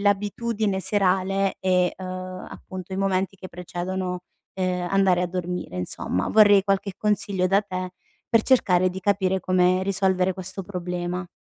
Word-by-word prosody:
l'abitudine 205 0 0
serale 195 0 +1
e, 180 -1 +2
uhm, 185 0 -6
appunto 185 0 -9
i - - -4
momenti 195 0 0
che 185 0 -9
precedono, 180 +1 -4 0.4
uhm, 180 -1 0
andare 195 -2 +3
a 180 - +1
dormire, 180 - -4
insomma. 90 0 -2
Vorrei 205 -2 +7
qualche 195 -1 0
consiglio 200 -3 0
da 195 +2 +4
te, 185 -2 -4 0.4
per 230 -1 +4
cercare 185 -8 +3
di 190 +1 -6
capire 190 -1 +1
come 185 0 +2
risolvere 190 -1 +1
questo 190 +1 -5
problema. 180 -1 -4
185 Hz, 140 wpm, -24 LUFS, 180-195 Hz, 0.4 s, Vorrei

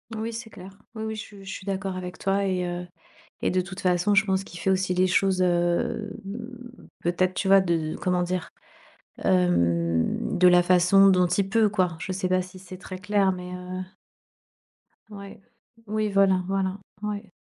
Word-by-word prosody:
Oui, 225 +1 -3
c'est 225 0 -7
clair. 190 -1 -11 0.2
Oui, 220 - -5
oui, 220 0 -3
je - - -4
suis 200 -2 -12
je 190 - -6
suis 195 - -8
d'accord 195 -1 -3
avec 180 0 -6
toi 195 0 0
et 180 -2 0
heu 175 0 -4 0.5
et - - +1
de 185 0 +2
toute 185 +1 -8
façon, 180 +3 +2
je 195 +2 +4
pense 190 -1 0
qu'il 175 -2 -11
fait 190 - -1
aussi 185 -1 +1
les 185 +1 +3
choses, 185 0 +2
heu, 175 +4 0 0.9
peut 175 +1 0
être, 185 0 +2
tu 195 - -1
vois, 195 0 +8
de 165 -3 -1
comment 180 -1 +1
dire? 180 -1 -3 0.8
Heu, 85 -2 +2 0.2
de 180 0 +3
la 180 0 +6
façon 185 +2 +5
dont 180 -1 +4
il 195 +2 0
peut, 220 0 +3
quoi. 180 -5 0
Je 190 - -5
sais 185 0 -2
pas 185 0 +2
si 185 +1 -12
c'est 185 0 -10
très 185 -1 -8
clair, 200 -1 +2
mais 180 0 -7
heu 180 0 -6 1.3
Oui, 200 -1 -10 0.5
oui, 215 0 -1
voilà, 195 -2 +3
voilà. 195 0 -1 0.2
Ouais. 210 -1 -4
185 Hz, 190 wpm, -25 LUFS, 180-195 Hz, 1.3 s, vois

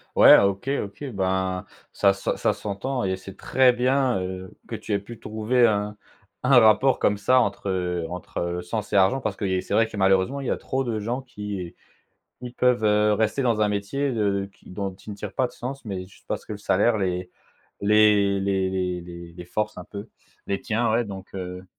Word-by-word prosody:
Ouais, - - +9
OK, 100 +5 0 0.2
OK, 100 +8 -9
ben, 95 -1 -1 0.3
ça 100 -1 +4
se 100 - -2
ça - - +1
s'entend 120 +6 -3
et 95 -1 0
c'est 95 0 -11
très 130 -1 +4
bien, 130 -2 +2
heu, 95 0 -5 0.2
que - - -5
tu - - -7
aies 100 - +2
pu 115 +3 -11
trouver 115 +3 +2
un 105 0 -1 0.4
un 130 0 +5
rapport 115 +4 +4
comme 105 0 +2
ça 130 +5 +4
entre, 100 -3 -2
heu, 90 -2 -1
entre, 90 -1 -6
heu, 85 0 -2
sens 105 +4 -4
et - - +2
argent 95 +7 +4
parce 110 -3 -2
que 100 - -7
il 95 - -1
y - - +1
é 90 - 0
c'est - - -6
vrai 115 0 +4
que 110 - -9
malheureusement 95 +7 +2
il 135 - -5
y - - 0
a - - +1
trop 135 0 -2
de 115 -3 -2
gens 120 +5 -3
qui 105 -6 -6
est 85 - -8 0.7
qui 125 -1 -6
peuvent, 125 -2 +2
heu, 105 0 +4
rester 110 +5 0
dans 115 -3 +2
un 105 - +3
métier 115 +8 -1
de 100 -3 0
qui - - -19
dont 95 -1 -4
ils 100 +3 -11
ne - - -6
tirent 100 -1 -7
pas 130 - +1
de - - -16
sens 135 +2 -6
mais 95 -3 -4
juste 95 - -21
parce - - -3
que - - -8
le - - -6
salaire 105 +3 +2
les 90 -2 -2 0.5
les 105 -1 +4
les 95 -1 0
les 90 -2 -2
les 85 -1 -10
les 90 0 -9
force 105 +4 -2
un 90 - -7
peu. 100 0 -8 0.4
Les 100 -1 -1
tiens, 115 +1 0
ouais, 115 +1 +2
donc, 95 -1 -9
heu 90 0 -6
100 Hz, 230 wpm, -24 LUFS, 95-115 Hz, 0.7 s, Ouais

